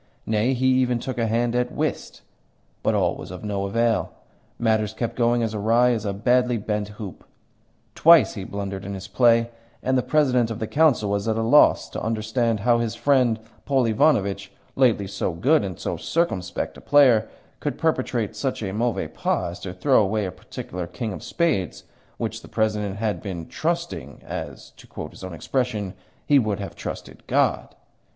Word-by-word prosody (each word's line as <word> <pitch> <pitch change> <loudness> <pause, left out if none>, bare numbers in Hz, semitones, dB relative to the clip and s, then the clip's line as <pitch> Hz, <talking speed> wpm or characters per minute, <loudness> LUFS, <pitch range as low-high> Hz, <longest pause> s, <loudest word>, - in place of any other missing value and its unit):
Nay, 110 +4 +1
he 130 +1 -1
even 130 -1 +3
took 125 +1 -5
a 115 - +1
hand 115 +2 +1
at 125 0 0
whist. - - -3 0.6
But - - +1
all - - +1
was - - -9
of 90 +1 -8
no 100 -2 -2
avail 115 +2 +1 0.5
matters 110 -2 +1
kept 120 0 -3
going 120 0 +2
as 110 -1 -2
awry 115 +4 +3
as 110 -3 -1
a 100 - 0
badly 125 +3 +2
bent 105 -1 -2
hoop. 100 -6 -8 0.7
Twice 165 -2 +6
he 100 - -6
blundered 100 0 -5
in 100 0 -5
his 95 -1 -7
play, 115 0 +3 0.3
and 130 - +1
the 130 - +3
President 125 -5 +2
of 115 - -4
the 110 - -3
Council 135 -7 +2
was 100 +1 -1
at 110 - +1
a 115 - 0
loss 145 +7 +5
to - - -5
understand 110 0 0
how 120 +1 +3
his 115 -1 -2
friend, 125 -4 +2 0.3
Paul 135 -3 +2
Ivanovitch, 100 -5 +1 0.2
lately 120 -6 +3
so 95 -2 -3
good 140 - +3
and 95 -4 -5
so - - -3
circumspect 95 - -2
a - - -12
player, 130 -7 +5 0.3
could - - -3
perpetrate - - -1
such - - -2
a 95 - -3
mauvais 115 -7 -1
pas 85 +2 -1
as 90 - -9
to 95 - -6
throw 110 +8 +3
away 105 +1 0
a 95 - -4
particular 90 -1 -7
king 105 +4 -4
of - - -7
spades 130 - -1 0.3
which - - -4
the - - -13
President 105 -2 -1
has 105 -1 -1
been 90 -5 -6
"trusting" - - -3
as - - -7
(to - - -15
quote - - -7
his - - -13
own 95 -2 -6
expression) 105 -1 -2 0.3
"he 145 -1 +5
would 105 -5 -1
have 100 - -6
trusted - - -7
God." - - +1
110 Hz, 185 wpm, -24 LUFS, 100-125 Hz, 0.7 s, Twice